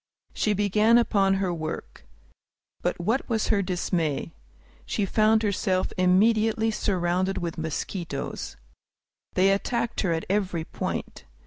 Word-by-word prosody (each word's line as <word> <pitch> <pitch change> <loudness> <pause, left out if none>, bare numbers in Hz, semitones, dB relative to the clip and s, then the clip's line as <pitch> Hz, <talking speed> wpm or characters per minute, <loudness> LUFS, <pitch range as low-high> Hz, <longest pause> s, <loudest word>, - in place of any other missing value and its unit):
She 215 - +1
began 210 +3 +4
upon 195 -5 +3
her 190 -2 0
work. 160 -1 -6 0.7
But - - -1
what 225 +11 -1
was 220 -2 0
her 205 -3 +3
dismay! 175 -5 -1 0.5
She 205 - -1
found 215 +2 +3
herself 190 -2 0
immediately 220 +4 +3
surrounded 185 -2 0
with 170 -2 -3
mosquitoes. 160 -1 -4 0.8
They 190 +1 +4
attacked 235 +4 -1
her 185 - 0
at 160 -1 -1
every 190 -4 0
point. - - -5
195 Hz, 120 wpm, -26 LUFS, 175-215 Hz, 0.8 s, began